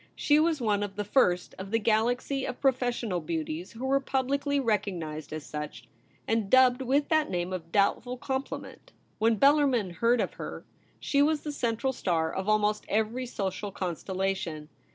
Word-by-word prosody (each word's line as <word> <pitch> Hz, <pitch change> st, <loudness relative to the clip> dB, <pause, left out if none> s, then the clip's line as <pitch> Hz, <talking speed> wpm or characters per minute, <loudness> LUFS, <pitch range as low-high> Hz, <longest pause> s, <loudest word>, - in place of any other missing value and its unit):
She 295 Hz, 0 st, +3 dB
was 320 Hz, -1 st, +2 dB
one 210 Hz, -4 st, +1 dB
of 200 Hz, -1 st, -4 dB
the 205 Hz, -, -2 dB
first 180 Hz, -5 st, +2 dB
of 190 Hz, +1 st, -6 dB
the 225 Hz, -, +2 dB
galaxy 235 Hz, +5 st, +1 dB
of 255 Hz, -, -4 dB
pro 270 Hz, -, +5 dB
fessional 240 Hz, -8 st, -2 dB
beauties 160 Hz, +2 st, -4 dB
who 235 Hz, +3 st, -6 dB
were 275 Hz, +1 st, +3 dB
publicly 275 Hz, +1 st, 0 dB
recognised 180 Hz, -, -2 dB
as 155 Hz, -1 st, -5 dB
such, 150 Hz, -6 st, -7 dB, 0.4 s
and 225 Hz, -3 st, 0 dB
dubbed 260 Hz, +1 st, +5 dB
with 275 Hz, +3 st, +1 dB
that 310 Hz, -1 st, +2 dB
name 175 Hz, 0 st, -2 dB
of 165 Hz, -2 st, -6 dB
doubt 200 Hz, +1 st, +3 dB
ful 250 Hz, +1 st, -6 dB
compliment. 265 Hz, +2 st, -5 dB, 0.3 s
When 225 Hz, 0 st, +3 dB
Bellarmin 275 Hz, -7 st, +4 dB
heard 235 Hz, +1 st, +3 dB
of -, -, -1 dB
her, -, -, -7 dB, 0.3 s
she 280 Hz, -, +1 dB
was 300 Hz, +1 st, +2 dB
the 300 Hz, -, -4 dB
central 250 Hz, 0 st, -1 dB
star 160 Hz, -7 st, 0 dB
of 190 Hz, +2 st, -2 dB
almost 210 Hz, 0 st, +2 dB
every 220 Hz, +4 st, 0 dB
social 200 Hz, -2 st, -3 dB
constellation. 185 Hz, -3 st, -3 dB
220 Hz, 175 wpm, -28 LUFS, 185-265 Hz, 0.4 s, pro